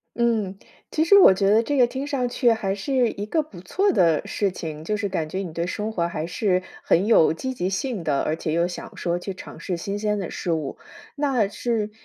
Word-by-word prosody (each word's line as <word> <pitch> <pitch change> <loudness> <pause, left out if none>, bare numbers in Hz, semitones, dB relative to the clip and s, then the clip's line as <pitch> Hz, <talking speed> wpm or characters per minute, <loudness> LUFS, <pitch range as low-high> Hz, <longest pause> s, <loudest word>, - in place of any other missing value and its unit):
嗯， 220 -5 0 0.3
其 315 - +2
实 400 +4 +7
我 195 - +8
觉 195 +1 +1
得 220 +2 +5
这 285 +4 -1
个 250 - +6
听 265 +3 -4
上 260 -4 0
去 240 -1 +2
还 205 -4 0
是 245 +4 +1
一 205 - -5
个 315 +6 +1
不 185 - -13
错 390 - +1
的 165 - +3
事 200 -3 -1
情。 155 -3 -6
就 210 +5 -1
是 205 -1 -1
感 165 -5 -2
觉 190 - -3
你 175 -5 -5
对 170 +1 -2
生 210 +3 -3
活 170 -5 0
还 160 -1 -4
是 185 +1 0 0.2
很 180 +4 +3
有 215 -9 +5
积 260 +11 -3
极 185 -5 -2
性 200 -1 -2
的， 145 -3 +1
而 155 - 0
且 160 -1 -3
又 170 +2 +2
想 180 - -8
说 175 0 -1
去 195 +2 -5
尝 - - -10
试 180 -3 -3
新 200 +4 -4
鲜 210 -1 0
的 190 - -4
事 175 - -3
物。 155 -4 -2 0.4
那 270 -8 +1
是， 215 0 -2
200 Hz, 255 characters per minute, -24 LUFS, 175-235 Hz, 0.4 s, 我